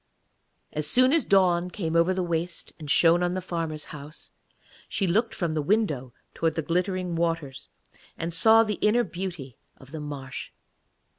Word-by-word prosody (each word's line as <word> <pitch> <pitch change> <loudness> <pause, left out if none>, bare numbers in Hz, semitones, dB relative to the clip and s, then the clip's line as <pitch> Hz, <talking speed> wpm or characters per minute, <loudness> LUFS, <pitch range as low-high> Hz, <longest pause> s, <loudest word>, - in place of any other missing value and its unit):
As 150 0 -1
soon 255 - +4
as 330 - +3
dawn 180 -2 +3
came 165 -3 -3
over 170 +2 +4
the 185 0 -1
waste 170 0 -3
and 150 -2 -8
shone 170 +3 +5
on 180 0 0
the - - -1
farmer's 165 -4 -4
house, 150 +1 -10 0.6
she 195 - -1
looked 220 +6 +1
from 170 -3 -2
the 155 - 0
window 150 - 0 0.2
towards 165 -1 0
the 160 - -2
glittering 180 +2 -1
waters, 165 -5 -2 0.5
and 165 +1 -3
saw 220 +7 +6
the 210 -2 -3
inner 230 +3 +3
beauty 175 - -6 0.2
of 135 +1 -16
the 160 - -6
marsh. 145 -3 -6
170 Hz, 165 wpm, -26 LUFS, 155-185 Hz, 0.6 s, saw